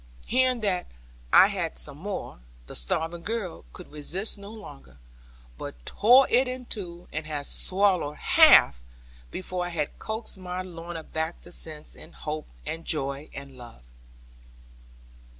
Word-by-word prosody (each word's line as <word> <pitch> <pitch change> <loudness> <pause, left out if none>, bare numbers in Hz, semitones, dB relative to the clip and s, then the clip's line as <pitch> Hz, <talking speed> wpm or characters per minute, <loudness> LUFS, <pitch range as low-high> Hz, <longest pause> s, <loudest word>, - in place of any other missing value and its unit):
Hearing 255 -1 +2
that 185 -4 0 0.4
I - - +9
had 185 -5 -2
some 145 0 +1
more, 195 - -5 0.3
the - - -9
starving 160 - -2
girl 205 - -4
could - - -12
resist 170 +8 -2
no 200 -1 -10
longer, 70 - -12 0.6
but - - -6
tore 250 +5 +6
it 250 +2 +4
in 255 0 -5
two, 175 -6 -6
and 155 0 -3
had 145 -2 -3
swallowed 185 -6 +2
half 65 -3 +7 0.5
before 180 -1 -3
I - - -5
had 155 -4 -3
coaxed 220 -2 -4
my 180 0 -4
Lorna 170 -2 -7
back 160 +2 -3
to - - -11
sense, 155 -3 -6
and - - -14
hope, 155 0 -5 0.2
and 165 +1 -4
joy, 140 -2 -2
and 140 -1 -9
love. 120 - -12
175 Hz, 145 wpm, -27 LUFS, 150-200 Hz, 0.6 s, I